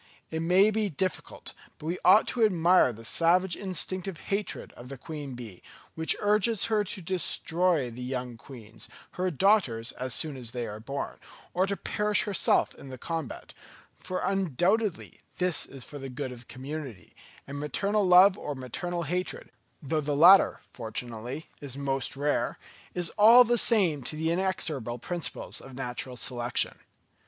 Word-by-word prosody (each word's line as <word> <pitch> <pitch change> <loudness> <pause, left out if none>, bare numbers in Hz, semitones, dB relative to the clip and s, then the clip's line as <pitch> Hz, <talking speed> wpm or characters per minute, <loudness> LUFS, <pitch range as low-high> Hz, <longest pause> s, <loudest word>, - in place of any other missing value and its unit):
It 160 - -2
may 185 +5 +4
be 215 -1 0
difficult, 185 +3 -4 0.2
but - - -11
we 170 +3 -2
ought 185 +5 +7
to 240 - 0
admire 180 - +4
the 115 0 -11
savage 175 +6 +2
instinctive 185 -1 -3 0.2
hatred 205 +1 -3
of 125 +1 -12
the 135 - -7
queen 145 -2 -7
bee, 115 -7 -9 0.3
which 160 0 +2
urges 210 +1 +3
her 210 -1 +3
to 190 -2 -7
destroy 170 -4 0
the 120 +2 -9
young 125 -1 -4
queens, 115 -3 -10 0.2
her 185 +1 -1
daughters, 160 - +2
as 130 -2 -2
soon 150 -4 0
as 120 -2 -8
they 120 -2 -3
are 105 -1 -7
born, 140 +5 -5 0.3
or 185 +2 +2
to 200 0 -2
perish 210 0 0
herself 205 -3 +2
in 140 - -12
the 130 - -8
combat; 160 -1 -5 0.4
for 185 - -5
undoubtedly 195 - 0 0.2
this 180 -3 +1
is 135 -2 -6
for 145 - -9
the 135 0 -6
good 130 +1 -5
of 125 - -9
the 120 - -14
community; 135 - -8 0.3
and 140 +1 -6
maternal 200 +8 0
love 185 +1 +6
or 145 - -4
maternal 170 +7 -4
hatred, 180 +4 -3 0.3
though 155 +2 0
the 145 0 -2
latter 180 +6 +7
fortunately 120 +4 -5
is 140 -3 -5
most 135 -2 -2
rare, 145 +1 0 0.4
is 175 -2 0
all 230 +4 +9
the 240 0 +1
same 195 - +3
to 125 +5 -5
the 160 +1 0
inexorable 165 -10 -1
principles 170 +2 -4
of 135 -1 -12
natural 125 -1 -4
selection. 120 -2 -1
160 Hz, 165 wpm, -28 LUFS, 130-185 Hz, 0.4 s, all